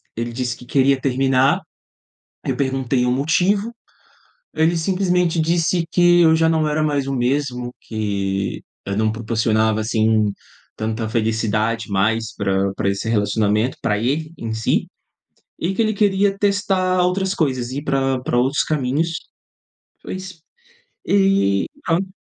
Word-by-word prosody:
Ele 120 +1 -3
disse 125 -1 -3
que 125 - -13
queria 135 +1 +2
terminar. 135 0 +2 0.8
Eu - - -1
perguntei 130 -2 0
o 125 - +1
motivo. 185 - +1 0.8
Ele 165 +2 +2
simplesmente 180 -1 +1
disse 170 +1 +1
que 175 0 +5
eu 160 -1 +5
já 160 0 +3
não 160 -1 +1
era 155 +1 0
mais 145 -3 0
o 135 - -2
mesmo, 125 -1 -1
que 100 -3 -3 0.2
eu 100 0 -3
não 110 0 +2
proporcionava, 110 -1 0
assim, 110 -1 +1 0.4
tanta 110 0 -3
felicidade 110 0 -1
mais 110 +3 0
pra 95 -1 0
pra 100 - -1
esse 100 +3 -3
relacionamento, 105 +2 +1
pra 105 -2 0
ele 150 +7 -1
em 115 -1 -5
si, 110 0 0 0.7
e 185 +3 -1
que 230 - 0
ele 215 -1 +1
queria 200 -1 +2
testar 195 -3 +1
outras 190 +2 +1
coisas, 130 -5 -1
ir 140 +2 -4
pra 135 -2 0
pra 120 - 0
outros 130 +4 +2
caminhos. 150 +3 -1 0.9
Foi - - -6
isso 185 -3 -8 0.7
e 195 - +2 0.2
pronto. 185 +3 0
130 Hz, 140 wpm, -20 LUFS, 110-170 Hz, 0.9 s, que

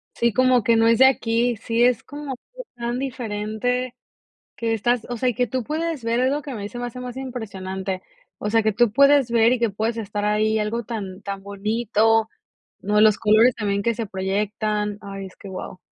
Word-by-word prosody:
Sí, 235 -1 +2
como 255 0 +4
que 230 +2 +3
no 225 0 +4
es 230 -1 +4
de 265 - +8
aquí, 235 -2 +1
sí, 230 +2 -1
es 245 -2 +3
como 285 -2 -7 0.4
tan 240 +1 -3
diferente 245 0 -2 0.6
que 230 -1 -1
estás, 240 +2 0
o 240 - -3
sea, 255 +2 +1
y - - -1
que 250 -1 +1
tú 255 +2 -2
puedes 310 -1 -3
ver, 230 +1 0
es 260 +1 +2
lo 295 +1 -1
que 285 - -7
a 250 - -5
mí 205 -1 -5
se 240 - -7
me 245 - -3
hace 245 +1 -7
más 250 -1 -6
impresionante, 190 -7 -5 0.4
o 210 - -2
sea, 225 +1 +3
que 220 -1 +1
tú 240 -1 +3
puedes 280 -1 +5
ver 230 +1 +4
y 250 - -1
que 235 -2 +2
puedes 220 +3 -2
estar 205 -1 -3
ahí, 215 +1 +2
algo 225 +3 -2
tan 200 -4 -6
tan 195 -1 -6
bonito, 220 +2 +1 0.5
no, 210 +2 +2
los 215 -1 +5
colores 225 +3 +5
también 200 -2 -1
que 235 +1 +1
se 230 -1 -4
proyectan, 210 +2 -2
ay 195 -1 -7
es 185 - -14
que 200 - -11
wao. 185 0 -7
225 Hz, 215 wpm, -23 LUFS, 210-245 Hz, 0.6 s, de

